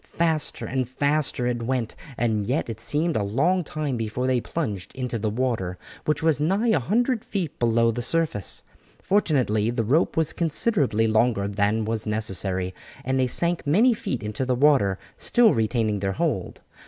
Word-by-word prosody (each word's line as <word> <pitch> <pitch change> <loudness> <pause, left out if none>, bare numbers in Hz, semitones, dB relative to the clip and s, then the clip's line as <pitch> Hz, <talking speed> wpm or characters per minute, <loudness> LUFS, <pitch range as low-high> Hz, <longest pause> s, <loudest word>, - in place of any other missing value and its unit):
Faster 160 -3 -1
and 130 -2 -2
faster 145 -1 0
it 120 -1 -1
went 120 -1 -2 0.2
and 110 -4 0
yet 130 +5 0
it 110 -1 -8
seemed 155 +7 +1
a - - +1
long 150 - +1
time 150 -4 -3
before 115 +3 -2
they 130 -2 +1
plunged 105 - -4
into 125 -3 -3
the 110 +1 -1
water, 110 -6 -2 0.3
which 150 0 0
was 160 -4 +3
nigh 195 +10 +1
a 165 - +3
hundred 225 - 0
feet 185 -8 -4
below 115 -1 +3
the 120 +2 -4
surface. 125 - -1 0.4
Fortunately 130 - +2
the 120 -1 -1
rope 150 +10 +2
was 160 -2 +1
considerably 155 - +1
longer 110 -2 +2
than 105 +2 0
was 110 0 -2
necessary, 95 -3 -1 0.3
and 130 +1 0
they 130 - +2
sank 170 +5 -1
many 220 - +4
feet 130 - -4
into 105 +4 -3
the 130 -1 0
water, 125 -8 +3 0.2
still 240 -3 +4
retaining 110 -2 0
their 95 0 -1
hold. - - -2
125 Hz, 170 wpm, -24 LUFS, 110-155 Hz, 0.4 s, many